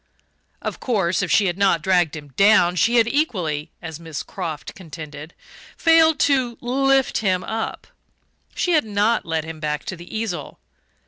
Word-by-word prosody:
Of -, -, -4 dB
course, 190 Hz, -8 st, 0 dB
if 180 Hz, -, -2 dB
she 205 Hz, -, +4 dB
had 180 Hz, 0 st, -1 dB
not 180 Hz, -5 st, +3 dB
dragged 180 Hz, -4 st, +2 dB
him 145 Hz, -2 st, -9 dB
down, 180 Hz, -, +4 dB
she 230 Hz, +8 st, +2 dB
had 230 Hz, -2 st, +5 dB
equally, 185 Hz, -, -1 dB
as 160 Hz, -1 st, -7 dB
Miss 160 Hz, -3 st, -6 dB
Croft 155 Hz, -3 st, -6 dB
contended, 155 Hz, -3 st, -10 dB, 0.4 s
failed 325 Hz, -1 st, +5 dB
to 255 Hz, -4 st, +2 dB
"lift 270 Hz, +2 st, +1 dB
him 185 Hz, -4 st, 0 dB
up" 225 Hz, 0 st, -4 dB, 0.7 s
she 355 Hz, -, 0 dB
had 310 Hz, -3 st, +4 dB
not 210 Hz, +1 st, 0 dB
led 160 Hz, -1 st, -1 dB
him 160 Hz, 0 st, -8 dB
back 150 Hz, -1 st, -3 dB
to 185 Hz, -, -4 dB
the 175 Hz, +5 st, -8 dB
easel. 215 Hz, -6 st, -4 dB
185 Hz, 165 wpm, -22 LUFS, 160-235 Hz, 0.7 s, had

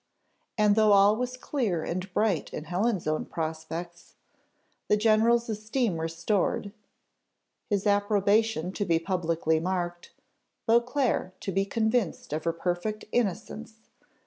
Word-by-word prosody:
And 210 Hz, -1 st, +4 dB
though 215 Hz, -1 st, +5 dB
all 200 Hz, +1 st, +6 dB
was 250 Hz, +2 st, -3 dB
clear 220 Hz, -, -1 dB
and 185 Hz, +2 st, -4 dB
bright 200 Hz, -4 st, 0 dB
in 155 Hz, -, -5 dB
Helen's 185 Hz, +4 st, -1 dB
own 155 Hz, 0 st, 0 dB
prospects, 165 Hz, +2 st, -6 dB, 0.7 s
the 210 Hz, -, +3 dB
general's 225 Hz, +2 st, +3 dB
esteem 215 Hz, -3 st, -1 dB
restored, 175 Hz, +5 st, -1 dB, 1.0 s
his 205 Hz, -1 st, 0 dB
approbation 205 Hz, -2 st, +2 dB
to 205 Hz, -, -2 dB
be 170 Hz, -4 st, +2 dB
publicly 165 Hz, -2 st, 0 dB
marked, 175 Hz, 0 st, -3 dB, 0.5 s
Beauclerc 235 Hz, -5 st, +1 dB
to 195 Hz, -, -3 dB
be 195 Hz, +1 st, +1 dB
convinced 220 Hz, -6 st, -1 dB
of 155 Hz, +1 st, -3 dB
her 165 Hz, -, +1 dB
perfect 180 Hz, +5 st, -3 dB
innocence! 220 Hz, +1 st, -2 dB
200 Hz, 120 wpm, -27 LUFS, 175-220 Hz, 1.0 s, all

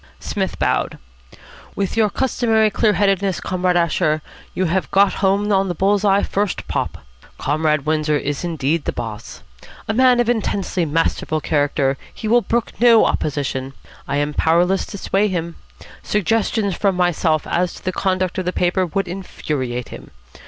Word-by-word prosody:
Psmith -, -, -3 dB
bowed. -, -, 0 dB, 0.8 s
"With 195 Hz, -2 st, -2 dB
your 220 Hz, -2 st, +3 dB
customary 225 Hz, -3 st, +1 dB
clear 210 Hz, +1 st, +2 dB
headedness, 195 Hz, -2 st, +1 dB
Comrade 180 Hz, -1 st, 0 dB
Asher, 165 Hz, -2 st, +1 dB, 0.3 s
you 185 Hz, -, 0 dB
have 185 Hz, +2 st, 0 dB
got 195 Hz, 0 st, +4 dB
home 200 Hz, +2 st, +2 dB
on 195 Hz, 0 st, +2 dB
the 175 Hz, -, -3 dB
bull's 200 Hz, +3 st, +2 dB
eye 200 Hz, -1 st, +3 dB
first 200 Hz, -3 st, -2 dB
pop. -, -, -3 dB, 0.3 s
Comrade 150 Hz, -1 st, 0 dB
Windsor 155 Hz, -1 st, +1 dB
is 145 Hz, +2 st, -3 dB
indeed 160 Hz, -2 st, -1 dB
the -, -, 0 dB
boss. 115 Hz, -2 st, -7 dB, 0.4 s
A 220 Hz, -, 0 dB
man 250 Hz, +1 st, +4 dB
of 240 Hz, -, +2 dB
intensely 200 Hz, -6 st, 0 dB
masterful 155 Hz, 0 st, 0 dB
character, 145 Hz, -3 st, 0 dB
he 220 Hz, -, -6 dB
will 240 Hz, +3 st, +4 dB
brook 235 Hz, 0 st, -1 dB
no 235 Hz, -2 st, +6 dB
opposition. 135 Hz, -2 st, -2 dB, 0.3 s
I 140 Hz, -, -1 dB
am 145 Hz, +1 st, -1 dB
powerless 175 Hz, +5 st, +2 dB
to 200 Hz, -, -7 dB
sway 200 Hz, +2 st, +1 dB
him. 170 Hz, -3 st, -3 dB, 0.4 s
Suggestions 210 Hz, 0 st, 0 dB
from 195 Hz, 0 st, +1 dB
myself 170 Hz, -3 st, +1 dB
as 180 Hz, 0 st, -1 dB
to -, -, -14 dB
the 185 Hz, -, 0 dB
conduct 185 Hz, 0 st, -1 dB
of 185 Hz, -, -3 dB
the 180 Hz, -, 0 dB
paper 180 Hz, +1 st, +1 dB
would 195 Hz, +5 st, -2 dB
infuriate 140 Hz, -9 st, -4 dB
him. -, -, -10 dB
185 Hz, 160 wpm, -20 LUFS, 155-200 Hz, 0.8 s, no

